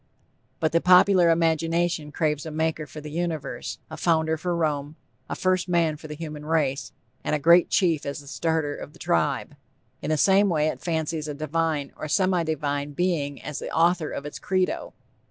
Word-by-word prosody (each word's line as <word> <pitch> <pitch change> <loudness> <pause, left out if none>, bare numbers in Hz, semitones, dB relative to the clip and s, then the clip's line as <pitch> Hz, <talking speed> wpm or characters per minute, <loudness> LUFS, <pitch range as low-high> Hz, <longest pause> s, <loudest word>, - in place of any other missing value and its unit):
But 160 -1 +1
the 170 - +2
popular 180 -1 +6
imagination 165 -1 +1
craves 150 0 -1
a - - -4
Maker 155 0 -1
for 150 - -9
the 150 0 -8
Universe, 160 -3 -3
a 155 - -8
founder 160 0 +1
for 175 +2 -2
Rome, 150 -2 -1 0.3
a - - -2
first 185 0 0
man 165 -3 +2
for 155 +1 -10
the 150 - -6
human 150 -1 -7
race, 150 -4 0 0.3
and - - 0
a - - +2
great 170 +4 +5
chief 170 -6 +2
as 140 +2 -4
the 145 - -13
starter 160 0 -1
of 150 - -9
the - - -16
tribe. 145 -7 0 0.5
In 150 - -4
the 155 - +2
same 195 +5 +4
way 155 -3 +2
it - - -6
fancies 160 -2 -2
a 150 - -4
divine, 155 -1 -1
or 155 - -6
semi 185 +2 +2
divine 145 -2 -2
being 150 -4 -1
as 150 - -5
the - - -5
author 170 -1 +2
of 140 - -5
its 150 - -7
_credo. 185 -1 -1
160 Hz, 190 wpm, -25 LUFS, 150-170 Hz, 0.5 s, popular